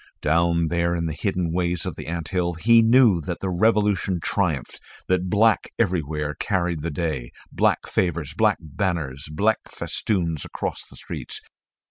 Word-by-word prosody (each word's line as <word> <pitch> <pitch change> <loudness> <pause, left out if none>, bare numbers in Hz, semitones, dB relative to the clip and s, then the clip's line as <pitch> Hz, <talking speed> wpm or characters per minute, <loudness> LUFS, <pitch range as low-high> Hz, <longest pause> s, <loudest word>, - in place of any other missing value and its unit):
Down 85 +2 +2
there 85 0 +1
in 85 -1 -1
the 80 - -2
hidden 90 +1 -1
ways 85 -1 0
of - - -4
the - - -8
anthill 85 +1 -1
he 115 +7 +5
knew 115 -6 +5
that 85 +3 -4
the 95 - -2
revolution 100 -2 +2
triumphed, 80 -6 -1 0.3
that 90 0 +1
black 110 +3 +3
everywhere 80 -7 0
carried 90 -5 0
the 85 - -2
day, 75 -6 -3 0.2
black - - +1
favours, 85 -5 -1
black 105 +2 +3
banners, 80 -5 -3
black 105 +8 +2
festoons 85 -8 -2
across - - -5
the - - -13
streets. - - -6
85 Hz, 150 wpm, -24 LUFS, 80-100 Hz, 0.3 s, he